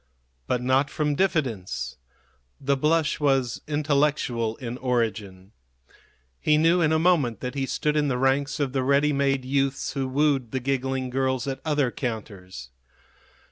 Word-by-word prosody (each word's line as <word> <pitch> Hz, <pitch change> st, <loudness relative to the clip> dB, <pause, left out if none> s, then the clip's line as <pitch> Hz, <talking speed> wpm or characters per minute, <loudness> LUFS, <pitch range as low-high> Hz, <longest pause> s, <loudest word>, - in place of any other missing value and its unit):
But 125 Hz, -1 st, 0 dB
not 130 Hz, +3 st, +2 dB
from 150 Hz, 0 st, -1 dB
diffidence. 135 Hz, -, -1 dB, 0.6 s
The 140 Hz, +1 st, +1 dB
blush 155 Hz, +3 st, +1 dB
was 135 Hz, -4 st, +1 dB
intellectual 145 Hz, -6 st, 0 dB
in 125 Hz, 0 st, -6 dB
origin. 110 Hz, -6 st, -2 dB, 0.9 s
He 150 Hz, 0 st, +3 dB
knew 165 Hz, +3 st, +4 dB
in 155 Hz, -2 st, +3 dB
a 160 Hz, -, +3 dB
moment 155 Hz, -9 st, +2 dB
that 125 Hz, -1 st, -4 dB
he 135 Hz, -1 st, -2 dB
stood 150 Hz, +2 st, -1 dB
in 150 Hz, -1 st, +2 dB
the 125 Hz, -3 st, 0 dB
ranks 135 Hz, +3 st, +1 dB
of 140 Hz, -3 st, -1 dB
the 135 Hz, -, +1 dB
ready 140 Hz, +3 st, +3 dB
made 135 Hz, -2 st, +1 dB
youths 135 Hz, 0 st, 0 dB
who 135 Hz, -2 st, -2 dB
wooed 135 Hz, -2 st, +1 dB
the 130 Hz, -, -2 dB
giggling 130 Hz, 0 st, -2 dB
girls 130 Hz, -1 st, 0 dB
at 135 Hz, -1 st, -4 dB
other 145 Hz, -5 st, +1 dB
counters. 95 Hz, -, -6 dB
135 Hz, 150 wpm, -25 LUFS, 125-145 Hz, 0.9 s, knew